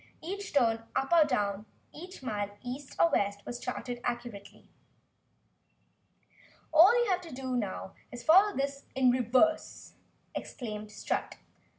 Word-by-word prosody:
Each 395 +5 -6
turn 230 -5 +2
up 270 +5 0
or 330 -2 +7
down, 210 -6 -1 0.3
each 360 -1 -10
mile 205 -4 -3
east 260 +3 -7
or 335 - +5
west, 200 0 0
was 240 0 -5
charted 245 -1 -5
accurately. 240 -4 -6 2.1
"All 365 +10 +7
you 410 - 0
have 365 0 +1
to 335 -3 -11
do 255 -2 -2 0.5
is 240 -1 -8
follow 385 +6 +6
this 275 0 -2
in 260 -1 +4
reverse," 255 +6 +1 0.4
exclaimed 215 -4 -6
Strut. - - -3
255 Hz, 125 wpm, -30 LUFS, 230-320 Hz, 2.1 s, or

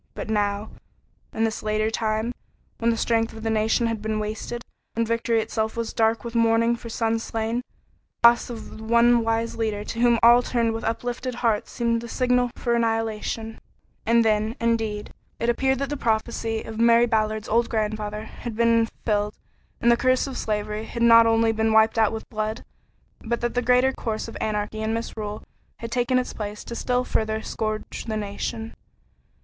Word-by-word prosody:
But 220 - -5
now, 205 0 0 0.6
in 225 - -1
this 225 0 -1
later 215 +1 0
time, 220 +1 -1 0.5
when 230 - +2
the 230 - +1
strength 225 0 +1
of 220 0 -9
the 225 - 0
nation 220 +2 +2
had 225 -2 -2
been 215 0 -2
wasted, 220 +3 -4 0.3
when 230 0 +1
victory 230 0 +1
itself 220 0 -2
was 230 -1 -3
dark 225 0 +2
with 235 -1 -6
mourning 230 0 +3
for 235 0 -9
sons 225 0 0
slain, 225 +1 -2 0.7
the 235 - +12
loss 235 +1 -2
of 230 -2 -8
the - - -9
one 235 +1 +4
wise 225 0 -1
leader 215 -2 -1
to 230 +2 -6
whom 240 -1 +4
all 240 +1 +8
turned 235 -2 0
with 225 - -4
uplifted 245 +2 -3
hearts 230 -3 0
seemed 230 -1 0
the 235 - -7
signal 250 0 +1
for 240 - -1
annihilation; 225 -1 -1 0.4
and 230 0 +3
then, 215 +1 +1
indeed, 225 -3 -1 0.3
it 235 - 0
appeared 265 +2 +2
that 275 +1 -2
the - - -1
prophecy 225 -1 -1
of 220 0 -7
Mary 235 +1 +6
Ballard's 215 -2 0
old 230 +2 +2
grandfather 215 -1 -2
had 225 +1 -8
been 230 0 +3
fulfilled 210 -2 -2 0.4
and 235 - +4
the 235 - +4
curse 255 +1 +2
of 270 -2 -6
slavery 210 0 -2
had 235 +1 -3
not 230 -1 +7
only 225 0 +3
been 220 0 +1
wiped 220 +1 +4
out 220 -2 +4
with 220 0 -6
blood, 215 +1 -3 0.5
but 235 +1 -2
that 240 0 -1
the 245 - +1
greater 250 +2 +3
curse 220 -4 -3
of - - -9
anarchy 215 0 -2
and 220 +1 -1
misrule 215 -2 -5 0.3
had 230 0 -7
taken 245 +1 +1
its 250 - -1
place 210 -1 -6
to - - -7
still 250 +2 0
further 220 -2 -1
scourge 215 -1 -4
the 220 -2 -2
nation. 220 +2 -4
225 Hz, 190 wpm, -24 LUFS, 220-235 Hz, 0.7 s, the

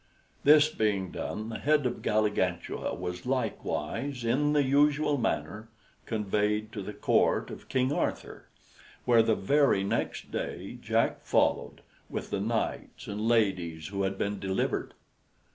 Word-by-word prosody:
This 150 +1 +7
being 105 - -1
done, 110 +1 -4
the 110 - -5
head 150 -1 +2
of 120 - -2
Galligantua 105 -5 0
was 90 +3 -5
likewise, 130 +1 -2
in 140 +6 +2
the 145 -1 +4
usual 145 +1 +3
manner, 110 -1 -2 0.4
conveyed 105 0 0
to 105 - -5
the 100 - -5
Court - - +1
of - - -10
King 130 +1 +1
Arthur, - - -3 0.6
where, 120 -2 +6
the 110 -1 +2
very 140 -2 +3
next 100 - -2
day, - - -5
Jack - - +1
followed, - - +1 0.3
with - - -5
the - - 0
knights - - -2
and 105 +2 -3
ladies 90 -8 +1
who 100 0 -3
had 95 0 -1
been 100 +1 -2
delivered. 95 0 -2
110 Hz, 140 wpm, -29 LUFS, 100-135 Hz, 0.6 s, This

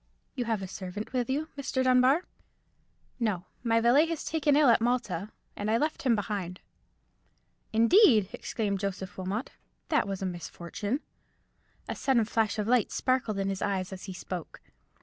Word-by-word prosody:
"You 250 -3 -2
have 220 -4 -1
a - - -4
servant 190 +5 -6
with 250 -1 0
you, 300 +4 -1
Mr. 260 -2 -1
Dunbar?" 255 +6 +4 0.9
"No, 205 -6 -1 0.2
my 230 -1 +3
valet 265 +8 +4
was 330 -3 -3
taken 300 -3 +2
ill 295 -1 +5
at 230 - +5
Malta, 215 -5 -1 0.2
and 205 +1 -3
I 225 - +3
left 305 +4 -1
him 250 -4 +3
behind." 195 -4 -3 1.1
"Indeed!" 230 - +5
exclaimed 200 -4 -2
Joseph 195 -1 -4
Wilmot; 190 +6 -3 0.4
"that 300 -9 +2
was 195 -1 -3
a - - 0
misfortune." 185 - -4 0.9
A - - -2
sudden 255 -5 +2
flash 220 -1 0
of 210 -1 -1
light 245 -3 +3
sparkled 255 -5 0
in 195 0 0
his 195 -1 -3
eyes 190 -2 -1
as 185 - -8
he 190 - -6
spoke. 180 -2 -7
220 Hz, 165 wpm, -29 LUFS, 195-255 Hz, 1.1 s, ill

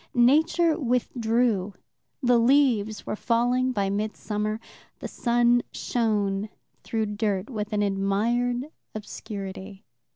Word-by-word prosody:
Nature 315 +6 +4
withdrew: 235 - 0 0.5
the 245 -1 +4
leaves 230 -4 +2
were - - -3
falling 245 +3 +1
by 200 -5 0
midsummer; 210 +1 -2 0.4
the - - -6
sun 240 0 +2
shone 210 -3 -1 0.3
through 220 -1 -1
dirt 205 0 -2
with 215 -2 -4
an 205 -1 +1
admired 235 +7 0 0.2
obscurity. 195 -2 -7
225 Hz, 100 wpm, -26 LUFS, 205-245 Hz, 0.5 s, Nature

